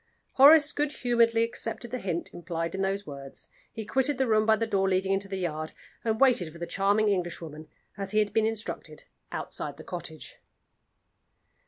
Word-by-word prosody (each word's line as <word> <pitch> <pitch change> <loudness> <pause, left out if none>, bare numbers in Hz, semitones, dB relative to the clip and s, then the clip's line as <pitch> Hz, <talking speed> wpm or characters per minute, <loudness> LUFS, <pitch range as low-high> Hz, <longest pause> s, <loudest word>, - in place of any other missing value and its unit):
Horace 295 +2 +7
good 295 0 -1
humoredly 230 -2 +2
accepted 235 0 -4
the 255 - -3
hint 175 -4 -3
implied 165 -1 -4
in 190 - -2
those 195 +1 -1
words. 140 -3 -9 0.2
He 220 -2 -6
quitted 265 +5 +1
the 265 - +2
room 215 -2 +2
by 220 - +6
the 230 - -1
door 195 -3 +1
leading 190 +1 +1
into 195 0 -1
the 195 0 -4
yard, 155 -3 -3 0.3
and 220 -1 0
waited 240 -12 +4
for 170 - -12
the 170 - -4
charming 200 +4 +2
Englishwoman, 170 -5 -3 0.3
as 195 -1 -3
he 210 - -1
had 210 -1 +2
been 220 -1 +3
instructed, 225 -1 -5 0.3
outside - - -5
the - - -10
cottage. 170 -3 -8
200 Hz, 180 wpm, -28 LUFS, 175-230 Hz, 0.3 s, Horace